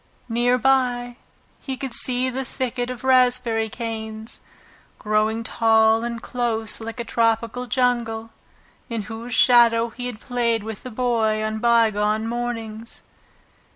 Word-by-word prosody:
Near 240 +2 +2
by 245 -2 +1 0.4
he 265 -1 -5
could 265 -3 -5
see 250 +1 +2
the 265 +2 -3
thicket 250 -1 -3
of 250 0 -7
raspberry 245 -4 +3
canes, 220 -1 -6 0.6
growing 215 +1 0
tall 225 0 +3
and 235 -1 -3
close 225 -2 -2
like 230 +2 -6
a - - -1
tropical 230 +1 0
jungle, 235 -2 0 0.6
in 230 -3 -3
whose 225 +3 -5
shadow 235 -1 +5
he 245 +2 -6
had 235 -4 -7
played 235 -3 -1
with 220 -2 -6
the 255 - -7
Boy 225 -3 0
on 215 0 -2
bygone 220 -2 +2
mornings. 230 -1 -4
230 Hz, 130 wpm, -22 LUFS, 220-245 Hz, 0.6 s, shadow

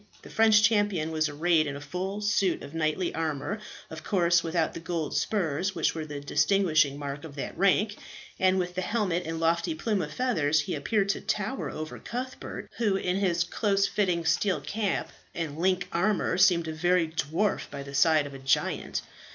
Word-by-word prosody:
The - - -12
French 220 -1 +5
champion 205 -7 +2
was 155 -1 +1
arrayed 155 +1 +2
in 140 - -4
a - - -6
full 185 +8 -4
suit 200 -3 +1
of 140 - -9
knightly 165 +3 -1
armour 160 +5 -2 0.3
of 160 0 -8
course 175 -4 +3
without 165 -1 0
the - - -6
gold 165 -2 -3
spurs 175 +2 0
which 165 - +1
were 160 -1 -5
the 145 -1 -5
distinguishing 155 -2 +2
mark 145 0 -5
of 155 -3 -9
that 140 - -5
rank 200 +3 +2 0.4
and 185 0 +3
with 180 -1 -2
his 185 0 -2
helmet 185 -7 -1
and 165 0 -3
lofty 165 0 +1
plume 205 +4 -1
of 150 -3 -4
feathers 155 - +1
he - - -4
appeared 205 -3 0
to - - 0
tower 210 +6 -2
above 155 0 -7
Cuthbert, 255 +2 -6
who, 215 -4 +1
in 185 -1 0
his 175 -4 +1
close 200 +2 +1
fitting 180 -5 0
steel 175 +1 +2
cap 200 +6 -2 0.2
and 160 -2 -4
link 185 0 +1
armour, 190 +3 +1
seemed 175 -3 +4
a 160 - -3
very 175 +1 +2
dwarf 160 +6 -1
by 140 -1 -6
the 140 0 -10
side 150 +2 +4
of 140 - -8
a 135 - -8
giant. 135 0 0
170 Hz, 190 wpm, -28 LUFS, 155-195 Hz, 0.4 s, French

